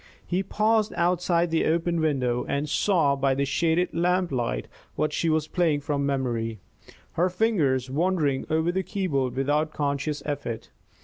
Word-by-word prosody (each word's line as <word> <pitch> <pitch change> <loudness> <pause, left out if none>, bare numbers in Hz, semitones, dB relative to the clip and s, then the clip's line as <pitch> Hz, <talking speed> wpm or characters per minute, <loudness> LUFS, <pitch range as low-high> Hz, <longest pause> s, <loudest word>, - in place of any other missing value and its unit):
He 180 +1 0
paused 215 +2 +1
outside 175 -1 +1
the 165 - +2
open 170 +1 +1
window 130 -6 0
and 145 +2 -1
saw 155 -3 +2
by 135 -1 +1
the 140 +1 0
shaded 165 +5 +1
lamplight 170 - 0 0.3
that 155 +1 0
she 165 - 0
was 155 -1 +1
playing 160 -4 +1
from 140 -1 -1
memory, 120 -5 -2 0.5
her 180 +3 +1
fingers 170 - +1
wandering 150 -1 0
over 160 +2 +1
the 190 +1 0
keyboard 140 -11 -1
without 150 +3 0
conscious 145 0 -2
effort. 120 -6 -4
155 Hz, 145 wpm, -26 LUFS, 140-175 Hz, 0.5 s, the